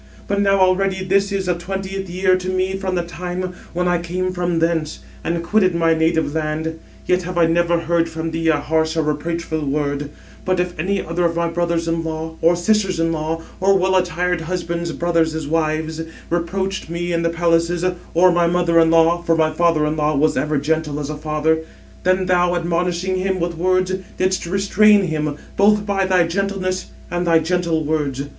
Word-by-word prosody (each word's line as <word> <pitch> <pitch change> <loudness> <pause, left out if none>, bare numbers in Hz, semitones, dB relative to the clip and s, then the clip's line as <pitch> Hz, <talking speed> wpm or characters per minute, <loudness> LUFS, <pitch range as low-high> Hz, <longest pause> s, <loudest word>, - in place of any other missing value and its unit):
But 200 0 0
now 195 -1 +3
already 190 0 +2
this 195 +1 +2
is 195 -1 -1
the 180 - +1
twentieth 190 +2 -5
year 185 +1 +2
to 185 0 -3
me 185 +1 0
from 190 -1 -2
the 175 - 0
time 180 +1 -5 0.2
when 180 +1 -1
I 175 -1 +2
came 180 +2 -3
from 175 -1 -1
thence, 165 -2 -1 0.2
and 170 0 -2
quitted 185 0 +2
my 165 -1 +3
native 160 -1 +1
land; 160 +1 -2 0.3
yet 180 0 +2
have 180 0 -6
I 170 - +5
never 170 +1 +2
heard 165 0 +1
from 160 0 -4
thee 165 0 -2
a 160 -2 +4
harsh 160 +2 0
or 160 - +2
reproachful 160 +1 -2
word; 145 0 -2 0.3
but 185 -1 0
if 180 0 -1
any 190 +4 -1
other 170 +2 -1
of 170 0 0
my 170 0 0
brothers 170 0 -1
in 165 0 -1
law, 160 0 -5
or 170 +2 +4
sisters 190 0 +1
in 165 0 +1
law, 160 +1 -3 0.2
or 195 +1 +4
well 190 0 +1
attired 180 -1 0
husband's 170 0 -3
brothers' 160 -3 0
wives, 160 0 -1 0.3
reproached 190 +2 -2
me 175 +1 -3
in 170 - +1
the 170 - +1
palaces, 170 +1 +1 0.3
or 180 +2 +6
my 175 -1 +2
mother 170 -1 +2
in 165 0 +5
law 165 +1 +4
(for 165 -1 +1
my 160 -1 +2
father 165 -1 +2
in 155 +1 -1
law 150 0 +1
was 150 +2 +2
ever 150 +3 0
gentle 150 0 -1
as 145 0 -4
a - - -4
father), 155 +1 0 0.4
then 185 +1 +2
thou, 180 -1 +2
admonishing 175 +2 -1
him 190 0 -1
with 170 0 -2
words, 185 +2 +1 0.2
didst 185 -1 0
restrain 200 +2 +4
him, 155 -4 -2 0.2
both 205 +1 +3
by 195 -2 0
thy 180 -2 +3
gentleness 185 +1 -2 0.2
and 175 0 -1
thy 165 -1 +5
gentle 165 -1 0
words. 145 -3 -1
170 Hz, 195 wpm, -20 LUFS, 160-185 Hz, 0.4 s, or